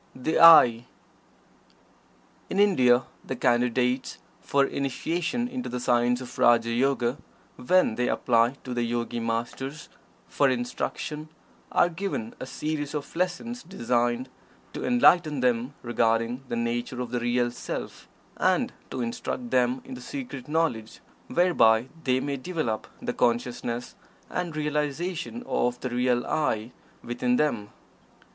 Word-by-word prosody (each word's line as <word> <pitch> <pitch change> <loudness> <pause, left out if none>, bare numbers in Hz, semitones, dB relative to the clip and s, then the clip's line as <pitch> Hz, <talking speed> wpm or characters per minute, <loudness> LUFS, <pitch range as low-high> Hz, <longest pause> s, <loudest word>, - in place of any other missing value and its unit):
THE 130 +5 0
"I." 125 -8 +8 1.6
In 195 - -1
India, 130 -12 +5 0.2
the 130 - -4
Candidates 125 +1 +1 0.2
for 140 0 +2
Initiation 170 - -2
into 250 0 -5
the 125 +1 -3
science 120 0 +2
of 125 0 -9
"Raja 115 -1 +4
Yoga," 125 +1 +1 0.4
when 180 +1 +3
they 125 +2 -1
apply 120 +1 +2
to 125 - -5
the 120 - -1
Yogi 120 0 -2
Masters 120 +6 -4 0.4
for 140 - +2
instruction, 130 +5 -3 0.4
are - - +4
given 170 - -4
a 130 - -6
series 150 +1 -3
of 145 +1 -5
lessons 185 +8 -2
designed 120 -5 -1 0.5
to - - -5
enlighten 175 - +4
them 125 +2 0
regarding 120 +1 0
the - - -3
nature 120 +2 -2
of 125 -2 -4
the 120 - 0
Real 120 0 +1
Self, 120 - -6 0.3
and - - +1 0.2
to 130 - -4
instruct 120 +1 -4
them 125 0 +2
in - - -8
the 125 - -8
secret 130 0 -7
knowledge 150 -9 -1 0.3
whereby 130 -10 +3 0.2
they 130 -1 +2
may 140 +1 -2
develop 130 -7 -3 0.2
the - - -2
consciousness 120 0 -1 0.4
and 175 -3 -3
realization 155 - -2
of 125 - 0
the 130 - -3
real 125 0 +1
"I" 115 -6 -1 0.3
within 125 +1 0
them. 115 -8 0
125 Hz, 130 wpm, -26 LUFS, 120-150 Hz, 1.6 s, I